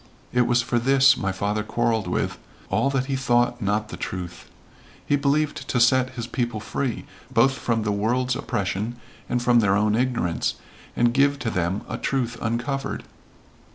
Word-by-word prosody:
It 125 Hz, -1 st, +3 dB
was 120 Hz, 0 st, +3 dB
for 120 Hz, -, 0 dB
this 135 Hz, +2 st, +5 dB
my 95 Hz, -7 st, -2 dB
father 100 Hz, +3 st, -1 dB
quarreled 110 Hz, -1 st, 0 dB
with 90 Hz, -, -2 dB, 0.3 s
all 135 Hz, -, +2 dB
that 135 Hz, -2 st, 0 dB
he 135 Hz, 0 st, -2 dB
thought 120 Hz, -1 st, +1 dB
not 105 Hz, +1 st, 0 dB
the -, -, -7 dB
truth. 90 Hz, -1 st, -6 dB, 0.6 s
He 145 Hz, -, +2 dB
believed 145 Hz, +1 st, 0 dB
to 125 Hz, -, 0 dB
set 130 Hz, +2 st, +4 dB
his 120 Hz, -, -3 dB
people 120 Hz, -2 st, -2 dB
free 125 Hz, +3 st, -3 dB, 0.3 s
both 135 Hz, 0 st, +4 dB
from 115 Hz, -4 st, -1 dB
the 105 Hz, -, 0 dB
world's 120 Hz, +5 st, 0 dB
oppression 100 Hz, +1 st, -2 dB, 0.3 s
and 125 Hz, -1 st, 0 dB
from 120 Hz, -1 st, +5 dB
their 100 Hz, -3 st, +3 dB
own 105 Hz, +1 st, +2 dB
ignorance, 115 Hz, -8 st, 0 dB, 0.4 s
and 120 Hz, 0 st, +3 dB
give 140 Hz, +2 st, +3 dB
to 115 Hz, -4 st, -3 dB
them 90 Hz, +3 st, -1 dB
a 120 Hz, -, -4 dB
truth 125 Hz, -3 st, -1 dB
uncovered. 120 Hz, +5 st, -2 dB
120 Hz, 170 wpm, -24 LUFS, 105-130 Hz, 0.6 s, this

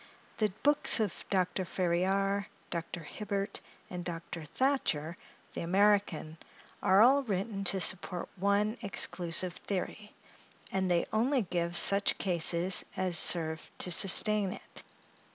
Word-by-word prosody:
The 215 Hz, -2 st, 0 dB
books 290 Hz, -3 st, +4 dB
of 210 Hz, -4 st, -3 dB
Dr. 185 Hz, 0 st, -1 dB
Ferriar, 190 Hz, +3 st, -1 dB, 0.2 s
Dr. 170 Hz, 0 st, -5 dB
Hibbert, 200 Hz, +4 st, -5 dB, 0.3 s
and 180 Hz, -1 st, -7 dB
Dr. 170 Hz, -1 st, -7 dB
Thatcher, 170 Hz, -, -1 dB, 0.4 s
the -, -, -5 dB
American, 185 Hz, -4 st, 0 dB, 0.4 s
are 195 Hz, +3 st, +5 dB
all 270 Hz, +4 st, +5 dB
written 200 Hz, -3 st, -4 dB
to 190 Hz, +1 st, 0 dB
support 180 Hz, 0 st, 0 dB
one 200 Hz, +3 st, 0 dB
exclusive 175 Hz, -2 st, -2 dB
theory; 205 Hz, +2 st, -6 dB, 0.6 s
and 190 Hz, -1 st, -1 dB
they 175 Hz, -1 st, +1 dB
only 245 Hz, +3 st, +1 dB
give 175 Hz, -1 st, -2 dB
such 200 Hz, 0 st, +4 dB
cases 175 Hz, 0 st, +3 dB
as 185 Hz, -2 st, -1 dB
serve 160 Hz, -2 st, +2 dB
to 180 Hz, -, -1 dB
sustain 200 Hz, +2 st, +5 dB
it. -, -, -7 dB
190 Hz, 120 wpm, -30 LUFS, 175-205 Hz, 0.6 s, are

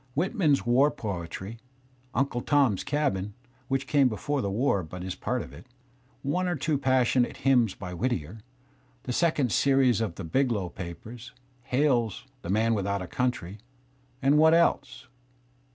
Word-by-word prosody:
Whitman's 160 Hz, -, +1 dB
war 130 Hz, +5 st, +4 dB
poetry, 100 Hz, -, -6 dB, 0.6 s
"Unde 125 Hz, -2 st, 0 dB
Tom's 135 Hz, -9 st, +3 dB
Cabin" 105 Hz, -10 st, -1 dB, 0.3 s
(which 135 Hz, +1 st, -1 dB
came 140 Hz, -2 st, +3 dB
before 135 Hz, +6 st, -2 dB
the 100 Hz, -, -2 dB
war 100 Hz, -1 st, +1 dB
but 90 Hz, +2 st, -8 dB
is 95 Hz, 0 st, -4 dB
part 125 Hz, +5 st, -2 dB
of -, -, -12 dB
it), -, -, -13 dB, 0.6 s
one 180 Hz, +7 st, 0 dB
or 175 Hz, -, 0 dB
two 150 Hz, 0 st, -1 dB
passionate 130 Hz, -2 st, +2 dB
hymns 120 Hz, -7 st, +3 dB
by 90 Hz, -2 st, -7 dB
Whittier, 90 Hz, -, -3 dB, 0.6 s
the 125 Hz, -, -3 dB
second 150 Hz, -6 st, +1 dB
series 130 Hz, -2 st, +3 dB
of 105 Hz, -7 st, -2 dB
the 95 Hz, -, -7 dB
"Biglow 105 Hz, 0 st, 0 dB
Papers," 110 Hz, +7 st, -9 dB, 0.3 s
Hale's 125 Hz, -5 st, +1 dB, 0.2 s
"The 85 Hz, -, -8 dB
Man 110 Hz, +3 st, +2 dB
\^ithout 100 Hz, -2 st, -1 dB
a -, -, -5 dB
Country" 125 Hz, -7 st, -2 dB, 0.3 s
— 130 Hz, 0 st, -36 dB
and 140 Hz, +2 st, +4 dB
what 160 Hz, +1 st, +6 dB
else? 165 Hz, -6 st, +1 dB
125 Hz, 150 wpm, -27 LUFS, 100-140 Hz, 0.6 s, what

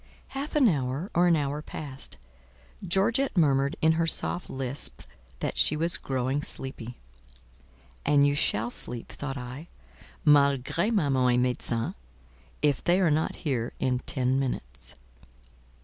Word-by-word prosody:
Half 275 Hz, +3 st, -5 dB
an 285 Hz, -5 st, +5 dB
hour 140 Hz, -, -1 dB
or 175 Hz, +1 st, +4 dB
an 170 Hz, -, +5 dB
hour 145 Hz, 0 st, -2 dB
passed; 140 Hz, -, -6 dB, 0.7 s
Georgette 225 Hz, +7 st, +1 dB
murmured 140 Hz, -2 st, +3 dB
in 160 Hz, -, +6 dB
her 165 Hz, +1 st, +1 dB
soft 175 Hz, +2 st, +2 dB
lisp 130 Hz, +1 st, -2 dB, 0.4 s
that -, -, -2 dB
she 155 Hz, -, +5 dB
was 165 Hz, +2 st, +1 dB
growing 130 Hz, +1 st, -1 dB
sleepy. 125 Hz, -4 st, -6 dB, 1.1 s
"And 145 Hz, -1 st, +4 dB
you 145 Hz, -, +3 dB
shall 115 Hz, -4 st, +1 dB
sleep," 120 Hz, -1 st, -4 dB
thought 140 Hz, -1 st, -5 dB
I, 130 Hz, +5 st, -8 dB, 0.6 s
"malgré 145 Hz, -, +3 dB
maman 135 Hz, -, +2 dB
and 125 Hz, +1 st, +3 dB
médecin, 120 Hz, -2 st, -1 dB, 0.7 s
if 145 Hz, -3 st, +2 dB
they 175 Hz, +2 st, +3 dB
are 175 Hz, -5 st, +3 dB
not 155 Hz, +2 st, 0 dB
here 120 Hz, -5 st, -1 dB
in 125 Hz, -1 st, 0 dB
ten 130 Hz, 0 st, 0 dB
minutes." 135 Hz, -2 st, -5 dB
140 Hz, 135 wpm, -27 LUFS, 130-165 Hz, 1.1 s, in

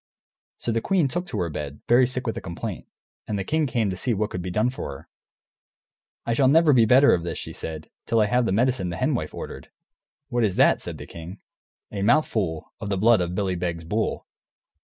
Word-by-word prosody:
So 120 Hz, -, -3 dB
the 115 Hz, 0 st, 0 dB
queen 180 Hz, -, +2 dB
took 175 Hz, +6 st, -3 dB
to 110 Hz, -, -4 dB
her 85 Hz, -, -1 dB
bed, 75 Hz, -1 st, -6 dB
very 125 Hz, +1 st, +5 dB
sick 130 Hz, 0 st, -3 dB
with 115 Hz, -, -2 dB
a -, -, -5 dB
complaint, 85 Hz, -2 st, -6 dB, 0.4 s
and 105 Hz, -, -2 dB
the 100 Hz, -, -2 dB
king 155 Hz, +8 st, 0 dB
came 115 Hz, -4 st, 0 dB
to -, -, -3 dB
see 110 Hz, +6 st, -1 dB
what 105 Hz, +1 st, -1 dB
could 90 Hz, -, -4 dB
be 90 Hz, -, -4 dB
done 110 Hz, +7 st, +1 dB
for 130 Hz, -, -6 dB
her. -, -, -17 dB, 1.2 s
"I 115 Hz, -, 0 dB
shall 130 Hz, +3 st, +3 dB
never 155 Hz, +2 st, +5 dB
be 115 Hz, -3 st, +6 dB
better 130 Hz, +5 st, +6 dB
of 85 Hz, -, +1 dB
this," 85 Hz, -1 st, -4 dB
she -, -, -6 dB
said, 80 Hz, -1 st, -6 dB, 0.2 s
"till 115 Hz, -, +2 dB
I 105 Hz, -, +5 dB
have 125 Hz, +2 st, +1 dB
the -, -, 0 dB
medicine 115 Hz, -3 st, +1 dB
the 85 Hz, -, -4 dB
Hen -, -, +1 dB
Wife -, -, -2 dB
ordered." -, -, -8 dB, 0.6 s
"What 120 Hz, -2 st, +1 dB
is 100 Hz, -4 st, +1 dB
that?" -, -, +4 dB
said -, -, -6 dB
the -, -, -8 dB
king. 85 Hz, +4 st, -9 dB, 0.5 s
"A 100 Hz, -, -4 dB
mouthful 105 Hz, -, +1 dB
of 105 Hz, -3 st, -5 dB
the 100 Hz, -, 0 dB
blood 110 Hz, +1 st, +4 dB
of 90 Hz, 0 st, -2 dB
Billy 95 Hz, -1 st, 0 dB
Beg's 85 Hz, -1 st, -3 dB
bull." 105 Hz, +7 st, -2 dB
110 Hz, 230 wpm, -24 LUFS, 90-125 Hz, 1.2 s, be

